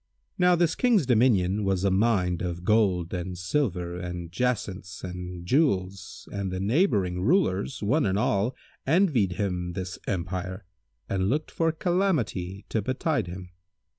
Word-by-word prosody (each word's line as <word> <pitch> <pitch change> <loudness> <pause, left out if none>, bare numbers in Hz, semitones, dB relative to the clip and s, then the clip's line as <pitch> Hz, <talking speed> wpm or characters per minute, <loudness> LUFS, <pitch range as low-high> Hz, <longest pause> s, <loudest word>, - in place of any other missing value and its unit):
[FN#166] - - -40
Now 180 0 +5
this 170 -1 +2
King's 230 - +3
dominion 105 -5 +3
was 95 -1 0
a 100 - +3
mine 95 -4 +2
of 85 -1 -4
gold 95 -5 +2
and 90 0 -4
silver 90 -4 -1
and 90 -1 -6
jacinths 100 -4 -2
and 90 -1 -6
jewels 95 - 0
and 100 -2 -3
the 95 - -3
neighbouring 100 - +1
rulers, 125 - +1
one 135 +5 +2
and 95 0 +1
all, 110 +2 +1 0.3
envied 140 - +3
him 90 -2 -2
this 90 0 -5
empire 95 +1 -3 0.4
and 95 0 0
looked 150 +6 -1
for 165 -1 +1
calamity 155 - -1
to 110 - 0
betide 130 - -1
him. 90 +1 -8
95 Hz, 145 wpm, -27 LUFS, 90-130 Hz, 0.4 s, Now